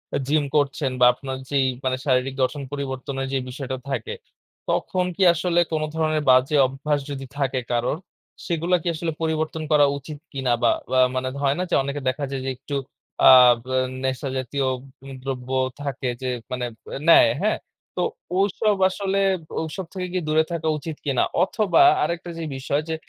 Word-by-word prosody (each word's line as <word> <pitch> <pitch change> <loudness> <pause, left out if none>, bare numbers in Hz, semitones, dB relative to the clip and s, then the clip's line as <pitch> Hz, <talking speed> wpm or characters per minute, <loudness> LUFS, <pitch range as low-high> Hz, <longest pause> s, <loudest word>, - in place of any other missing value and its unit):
এ - - +2
gym 150 +1 +2
করছেন 140 -1 +1
বা 125 - +7
আপনার 130 +1 -6
যেই 140 -2 +2 0.2
মানে 130 0 +1
শারীরিক 130 -1 +1
গঠন 145 +3 -1
পরিবর্তনের 135 -1 -4
যে - - +2
বিষয়টা 130 0 -5
থাকে 440 - -3 0.6
তখন 185 -2 0
কি 195 - +1
আসলে 175 +1 +1
কোন 155 -1 0
ধরনের 155 -1 +1
বাজে 130 +3 +5
অভ্যাস 145 +3 -1
যদি 135 -1 -5
থাকে 135 -2 0
কারোর 120 +4 0 0.5
সেগুলা 170 +1 +1
কি 175 - -6
আসলে 165 +1 -2
পরিবর্তন 160 0 -1
করা 150 -1 +6
উচিৎ 145 +1 -9
কিনা 130 -3 -1
বা - - +5 0.2
বা 130 - +2 0.2
মানে 130 0 -1
হয় 140 0 +2
না - - +1
যে - - +2
অনেকে 140 +1 -4
দেখা 135 +3 -3
যায় 135 -1 -3
যে - - -1
একটু 145 - -6 0.5
আ - - +11 0.3
ব - - -35 0.4
নেশা 130 +1 -2
জাতীয় 130 +2 -2
উ - - -7 0.5
দ্রব্য 130 -2 -5 0.3
থাকে 135 -2 -3
যে 130 - -2 0.2
মানে 125 -1 -2 0.3
এ - - -3
নেয় - - +8
হ্যাঁ? - - +1 0.4
তো - - -1 0.4
ওসব 205 +2 +2
আসলে 195 0 -1 0.4
ওসব 170 +4 -5
থেকে 185 -2 -3
কি 185 - +1
দূরে 155 +1 +3
থাকা 165 -2 -2
উচিত 155 +1 -6
কিনা? 135 -4 +2 0.2
অথবা 205 - +2 0.2
আরেকটা 175 +1 -3
যে 165 - -4
বিষয় 140 +2 -1
যে 160 - 0
145 Hz, 175 wpm, -23 LUFS, 130-160 Hz, 0.6 s, আ